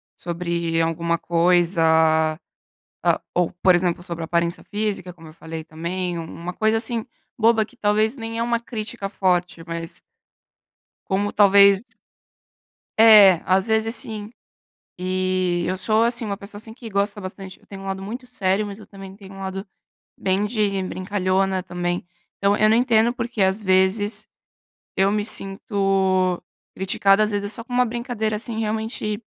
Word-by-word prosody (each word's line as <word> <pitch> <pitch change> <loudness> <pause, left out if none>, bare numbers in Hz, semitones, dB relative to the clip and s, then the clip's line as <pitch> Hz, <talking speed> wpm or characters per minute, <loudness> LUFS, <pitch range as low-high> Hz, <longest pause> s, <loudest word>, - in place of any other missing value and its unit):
sobre 170 -1 -2
alguma 170 +1 0
coisa 170 0 +2 1.2
a - - +3
ou, 175 -2 +1
por 185 -1 +6
exemplo, 175 -1 -1
sobre 170 -2 -5
aparência 170 +1 -1
física 205 -4 -3
como 165 -2 -14
eu - - -13
falei 160 -1 -7
também, 170 +2 -4
um 165 - -5
uma 170 +2 -7
coisa 220 +3 +1
assim, 230 0 -2 0.3
boba 225 -1 +4
que 250 - -19
talvez 215 +4 +1
nem 225 -1 -5
é - - 0
uma 235 0 +1
crítica 225 -3 -5
forte, 180 -3 0
mas 165 +1 -6 1.1
como 200 +2 0
talvez 200 +1 +6 1.1
É, 210 -4 +9
às 190 +2 +2
vezes 220 +1 +1
sim. 215 -1 -1 0.7
E 185 -1 0
eu 185 +1 -1
sou, 215 +4 +2
assim, 235 0 +1
uma 200 -1 -3
pessoa, 205 +1 -10
assim, 220 +1 -8
que 235 -3 -9
gosta 200 +1 -1
bastante 190 0 -8
eu - - -25
tenho 195 -1 -10
um - - -8
lado 190 0 -4
muito 240 +6 -7
sério, 200 -3 0
mas 200 0 -8
eu 215 - -13
também 195 -1 -11
tenho 195 -2 -13
um 195 - -10
lado 190 +1 -5 0.5
bem 195 +2 0
de 205 -3 0
brincalhona 185 0 -1
também. 175 -1 -3 0.3
Então, 200 +1 +2
eu 215 - +4
não 220 - +4
entendo 235 -1 +3
por 240 -1 -4
que, 225 -5 -1
às 190 +3 +1
vezes, 205 +3 +2 0.7
eu 195 +1 +3
me 210 -1 0
sinto 195 -3 +1 0.3
criticada, 195 +2 +3
às 215 - -1
vezes, 205 0 -2
só 230 - -4
com 245 - -10
uma 250 0 +3
brincadeira, 235 -2 -2
assim, 225 +1 -4
realmente 220 0 -3
195 Hz, 160 wpm, -22 LUFS, 185-220 Hz, 1.2 s, É